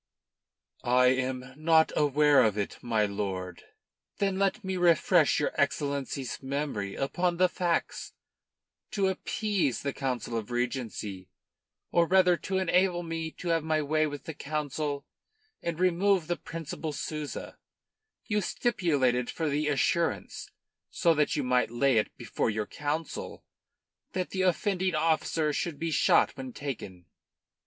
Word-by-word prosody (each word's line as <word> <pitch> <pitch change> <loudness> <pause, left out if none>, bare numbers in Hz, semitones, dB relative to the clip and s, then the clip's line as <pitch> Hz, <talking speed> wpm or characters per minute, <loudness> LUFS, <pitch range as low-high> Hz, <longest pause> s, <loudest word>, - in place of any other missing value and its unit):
"I 125 +1 +5
am 130 0 -3
not 160 +1 +4
aware 145 -1 +4
of 105 -2 +1
it, 100 - -3
my 110 -3 +1
lord." 95 -3 -4 0.6
"Then 195 -1 0
let 200 +4 +1
me 190 0 -2
refresh 170 -2 +4
your 150 - 0
Excellency's 140 -2 -2
memory 135 -8 -3
upon 175 +5 0
the 185 +1 +5
facts. 175 -1 -2 0.8
To 195 -2 +2
appease 190 - -1
the 140 -1 -1
Council 125 -4 -3
of 110 0 -5
Regency, 120 -6 -3 0.6
or 170 -1 +3
rather 185 -1 +5
to 190 +2 -3
enable 180 -1 +2
me 165 -1 -3
to 175 - -6
have 165 -2 +2
my 155 -1 +1
way 155 +1 +2
with 145 -1 -7
the 160 - -6
Council 145 -1 -3 0.6
and 170 -1 -3
remove 185 0 +3
the 175 +2 -1
Principal 160 -2 -6
Souza, 150 +1 -5 0.7
you 210 -2 0
stipulated 145 - +1
for 160 -2 -2
the 150 +1 0
assurance 160 +4 0 0.4
so 170 - +3
that 150 -1 +1
you 145 - 0
might 125 -1 +2
lay 125 +1 +2
it 105 - -3
before - - -1
your 110 -1 -1
Council 150 +6 -4 0.7
that 185 -1 -2
the 190 - -1
offending 185 0 +1
officer 155 -1 +1
should 160 0 -2
be 165 +1 -2
shot - - +4
when 130 -2 -7
taken." 100 -11 -6
150 Hz, 140 wpm, -29 LUFS, 130-175 Hz, 0.8 s, I